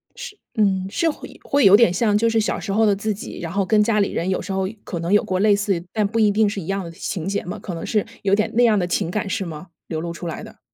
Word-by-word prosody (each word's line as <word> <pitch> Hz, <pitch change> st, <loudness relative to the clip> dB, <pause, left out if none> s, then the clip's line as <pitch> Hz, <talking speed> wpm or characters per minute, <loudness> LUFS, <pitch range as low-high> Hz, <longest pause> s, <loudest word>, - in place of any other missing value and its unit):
是 415 Hz, -, -9 dB, 0.2 s
嗯。 190 Hz, -3 st, +2 dB
是 330 Hz, -, +1 dB
会 300 Hz, -, -8 dB
会 285 Hz, 0 st, +2 dB
有 195 Hz, +1 st, +9 dB
点 210 Hz, -5 st, +5 dB
像 210 Hz, +2 st, +2 dB
就 230 Hz, +2 st, +2 dB
是 225 Hz, 0 st, +2 dB
小 215 Hz, -, -1 dB
时 200 Hz, -, -5 dB
候 220 Hz, +3 st, +3 dB
的 205 Hz, -2 st, +3 dB
自 215 Hz, +2 st, -2 dB
己， 200 Hz, -, -8 dB
然 165 Hz, -2 st, -5 dB
后 195 Hz, +1 st, 0 dB
跟 210 Hz, +2 st, +3 dB
家 215 Hz, 0 st, +1 dB
里 200 Hz, -, +1 dB
人 175 Hz, -, -2 dB
有 185 Hz, -, 0 dB
时 195 Hz, -, -6 dB
候 190 Hz, 0 st, 0 dB, 0.2 s
可 175 Hz, -, -5 dB
能 170 Hz, +2 st, -3 dB
有 205 Hz, -, +5 dB
过 185 Hz, -1 st, -1 dB
类 205 Hz, +1 st, +4 dB
似， 200 Hz, -4 st, -1 dB
但 215 Hz, -2 st, +1 dB
不 225 Hz, +3 st, -2 dB
一 210 Hz, -2 st, +4 dB
定 215 Hz, +1 st, +3 dB
是 200 Hz, -1 st, -4 dB
一 160 Hz, -, -9 dB
样 195 Hz, 0 st, -2 dB
的 170 Hz, -, -8 dB
情 170 Hz, +1 st, -5 dB
节 200 Hz, -, -1 dB
嘛， 180 Hz, -, -6 dB
可 185 Hz, -, -6 dB
能 165 Hz, -, -5 dB
是 210 Hz, -3 st, 0 dB, 0.2 s
有 195 Hz, -1 st, +1 dB
点 215 Hz, +1 st, 0 dB
那 245 Hz, -, +4 dB
样 225 Hz, -3 st, +4 dB
的 180 Hz, -3 st, 0 dB
情 175 Hz, -1 st, -1 dB
感 205 Hz, 0 st, -2 dB
是 190 Hz, -, -2 dB
吗？ 160 Hz, +1 st, -8 dB, 0.2 s
流 160 Hz, -2 st, -3 dB
露 170 Hz, 0 st, -4 dB
出 170 Hz, +1 st, -7 dB
来 165 Hz, -, -5 dB
的。 -, -, -13 dB
200 Hz, 330 characters per minute, -21 LUFS, 185-215 Hz, 0.2 s, 有